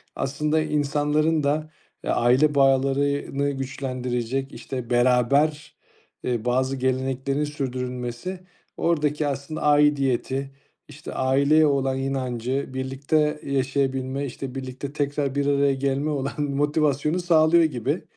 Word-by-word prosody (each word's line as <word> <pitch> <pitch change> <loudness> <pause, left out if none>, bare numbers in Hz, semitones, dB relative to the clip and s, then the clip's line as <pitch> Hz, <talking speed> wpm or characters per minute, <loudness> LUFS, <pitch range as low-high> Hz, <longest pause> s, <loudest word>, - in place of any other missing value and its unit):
aslında 150 +3 0
insanların 150 +1 +1
da, 155 +2 0 0.3
eee, - - -4
aile 130 +5 +3
bağlarını 140 +1 +2
güçlendirecek, 130 -1 -3
işte, 125 -3 -6
beraber, 130 +5 +2 0.5
eee, 120 -2 -2
bazı 130 +2 +1
geleneklerin 130 +2 -1
sürdürülmesi, 125 +2 -4 0.4
oradaki 150 -3 +1
aslında 140 +2 -4
aidiyeti, 140 -2 +2 0.4
işte, 150 0 -9
aileye 140 +4 +3
olan 135 -2 +1
inancı, 130 0 -2
birlikte 140 +4 0
yaşayabilme, 135 0 -1
işte, 130 0 -7
birlikte 135 +1 -6
tekrar 145 -1 -1
bir 140 - +1
araya 140 -1 +3
gelmek 140 +3 -1
olan 140 -1 -2
motivasyonu 145 +2 +1
sağlıyor 170 -1 +4
gibi. 130 -8 -1
140 Hz, 105 wpm, -24 LUFS, 130-150 Hz, 0.5 s, sağlıyor